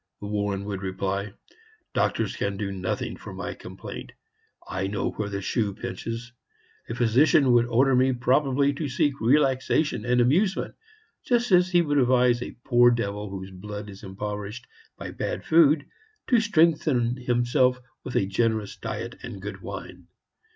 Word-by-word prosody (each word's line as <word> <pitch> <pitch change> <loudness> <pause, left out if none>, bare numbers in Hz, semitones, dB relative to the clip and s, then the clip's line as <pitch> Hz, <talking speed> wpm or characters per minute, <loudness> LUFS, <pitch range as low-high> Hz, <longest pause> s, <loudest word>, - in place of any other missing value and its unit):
Warren 100 -1 -2
would 100 -2 -4
reply: 95 +1 -2 0.6
"Doctors - - 0
can 100 -1 -2
do 100 -1 -3
nothing 95 -1 -3
for - - -10
my - - -4
complaint. - - -9 0.5
I 95 +1 -2
know 100 +1 -2
where 105 -1 -4
the 100 -1 -4
shoe 100 -2 -1
pinches. 120 0 -6 0.6
A - - -3
physician 130 +3 +4
would 120 -1 +4
order 130 +3 +3
me 130 +1 +4
probably 135 +3 +2
to 145 +1 -4
seek 140 +3 +1
relaxation 135 +4 +2
and 125 0 +2
amusement, 175 - +2 0.5
just 240 -2 +1
as 180 0 +5
he 175 -2 +4
would 145 -2 +1
advise 125 -1 +3
a - - -7
poor 120 -1 +6
devil 105 -3 -2
whose 95 0 -7
blood 105 +2 -7
is 95 - -12
impoverished 105 +3 -6 0.3
by - - -6
bad - - -4
food 155 -2 +5 0.4
to 245 - +5
strengthen 155 - +2
himself 125 +1 +2 0.2
with 125 - -7
a - - +3
generous 110 +1 0
diet - - -5
and - - -7
good - - -7
wine. - - -8
120 Hz, 150 wpm, -26 LUFS, 105-140 Hz, 0.6 s, poor